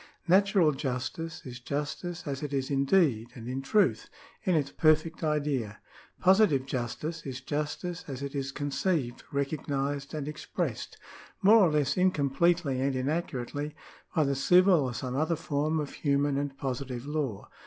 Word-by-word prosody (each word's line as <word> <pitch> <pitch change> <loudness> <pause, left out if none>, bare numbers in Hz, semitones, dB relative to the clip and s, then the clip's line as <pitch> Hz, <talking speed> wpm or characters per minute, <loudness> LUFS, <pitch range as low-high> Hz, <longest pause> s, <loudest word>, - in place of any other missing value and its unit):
Natural 190 -2 +5
justice 140 +4 -4
is 120 -2 -7
justice 150 +7 -4
as 140 -2 -3
it 145 -2 -4
is 135 +1 -2
in 140 0 +2
deed 135 - +3
and 115 -2 -8
in 130 +2 -3
truth 205 +10 +2 0.2
— - - -28
in 185 -3 +3
its 140 -3 0
perfect 155 +1 +2
idea. 145 -9 -1 0.4
Positive 185 -8 +4
justice 135 +6 -4
is 130 -2 -5
justice 150 +5 -3
as 135 -1 -5
it 140 - -5
is 140 -1 -2
conceived, 145 -1 -1
recognised, 140 0 -2
and 150 -2 -4
expressed, 150 0 -4 0.5
more 210 +4 +8
or 195 -6 +6
less 150 0 +1
incompletely 170 -4 +2
and 135 0 +1
inaccurately, 145 0 -2 0.4
by 155 - +4
the 140 -1 +1
civil 180 +6 +5
or 130 -4 -1
some 125 +2 -4
other 160 +4 +1
form 155 0 -1
of 145 -2 -4
human 140 -1 +1
and 140 -1 -2
positive 130 -1 -4
law. 145 -8 -3
145 Hz, 155 wpm, -29 LUFS, 135-160 Hz, 0.5 s, more